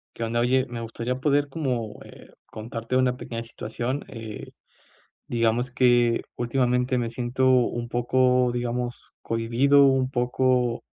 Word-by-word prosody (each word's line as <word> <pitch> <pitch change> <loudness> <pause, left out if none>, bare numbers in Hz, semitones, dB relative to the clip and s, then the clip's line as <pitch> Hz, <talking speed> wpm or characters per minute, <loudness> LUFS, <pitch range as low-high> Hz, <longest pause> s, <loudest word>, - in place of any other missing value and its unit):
¿Qué 115 - -4
onda? 115 +1 -1
Oye, 130 +2 +2
me 120 -1 -6
gustaría 115 +2 -3
poder 145 +1 +2
como, 125 -8 -3
eh, - - -14 0.2
contarte 115 +2 -5
una 130 -1 +2
pequeña 115 -2 -6
situación, 120 +4 -4
eh, 110 -3 -8 0.8
digamos 120 +1 0
que 120 -2 +3
últimamente 125 +1 +1
me 120 -1 -1
siento 125 +2 0
un 120 -2 +2
poco, 125 +1 +2
digamos 120 0 -4
cohibido, 120 +5 +3
un 135 -1 +2
poco 125 -1 +1
125 Hz, 130 wpm, -25 LUFS, 115-130 Hz, 0.8 s, que